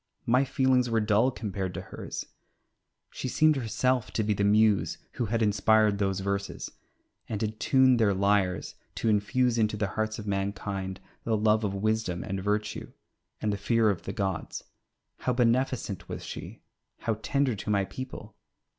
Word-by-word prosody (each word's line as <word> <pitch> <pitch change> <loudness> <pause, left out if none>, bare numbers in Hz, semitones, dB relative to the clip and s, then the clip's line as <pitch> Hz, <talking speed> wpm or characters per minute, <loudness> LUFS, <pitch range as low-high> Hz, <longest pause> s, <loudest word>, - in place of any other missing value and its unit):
My 125 +3 +4
feelings 130 -2 +2
were 115 -1 +2
dull 110 +3 +3
compared 100 -7 -4
to - - -4
hers. - - -5 0.9
She - - -4
seemed 155 +4 +4
herself 125 0 0
to 110 - +1
be 105 0 +1
the 100 - -1
muse 105 -1 +3
who 120 - -2
had 115 +2 +1
inspired 105 0 +3
those 95 -1 0
verses, 100 +1 -3 0.6
and 110 - -2
had 110 0 -3
tuned 130 -1 +4
their 110 -3 +4
lyres 100 -2 +1 0.2
to 115 - 0
infuse 115 +3 +2
into 110 -1 +1
the 100 -1 -1
hearts 110 +2 -2
of 105 - -7
mankind 95 -1 -3 0.2
the 110 -1 +1
love 110 +1 +3
of 100 -2 -1
wisdom 110 -3 -1
and 95 0 -3
virtue 105 +2 -2 0.5
and 105 -1 0
the - - -2
fear 110 +1 +3
of 90 -4 -4
the - - -5
gods. 95 -5 -3 0.5
How 125 - -1
beneficent 120 -4 0
was - - -6
she, - - -8 0.4
how 110 -2 -1
tender 135 +2 +1
to 105 - -6
my 100 -2 +2
people! 110 -3 -8
110 Hz, 165 wpm, -28 LUFS, 100-115 Hz, 0.9 s, My